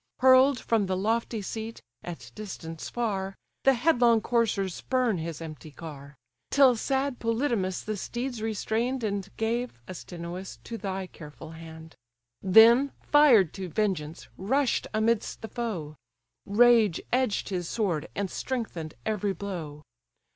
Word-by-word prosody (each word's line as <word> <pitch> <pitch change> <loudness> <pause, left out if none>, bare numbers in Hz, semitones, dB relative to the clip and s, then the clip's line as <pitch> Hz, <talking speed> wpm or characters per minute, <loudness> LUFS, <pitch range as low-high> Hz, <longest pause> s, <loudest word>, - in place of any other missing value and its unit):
Hurl'd 260 0 +6
from 220 -3 +1
the 185 0 -1
lofty 225 +2 -1
seat, 225 +3 -6 0.2
at 145 -10 -8
distance 165 - -7
far, 195 -5 -2 0.3
The 270 -1 +6
headlong 240 -4 +4
coursers 210 -6 +1
spurn 250 -5 0
his 165 0 -5
empty 155 -1 -9
car; 145 -2 -10 0.3
Till 270 -3 +6
sad 270 +2 -1
Polydamas 230 -5 0
the 215 0 -3
steeds 240 +3 -4
restrain'd, 225 +3 -1
And 200 -2 -2
gave, 230 - -2
Astynous, 175 +1 -7
to 230 -1 -6
thy 190 -2 -3
careful 160 -2 -11
hand; 160 0 -11 0.5
Then, 230 +8 +6
fired 250 - +5
to 190 -2 -6
vengeance, 170 -4 -2
rush'd 260 +7 +1
amidst 220 +1 0
the 220 - -5
foe: 180 - -4 0.5
Rage 220 -3 +5
edged 255 -5 +1
his 180 -3 -3
sword, 180 -9 -1
and 200 -2 -2
strengthen'd 215 -12 -4
every 210 -2 0
blow. 165 -6 -6
210 Hz, 130 wpm, -27 LUFS, 175-235 Hz, 0.5 s, Hurl'd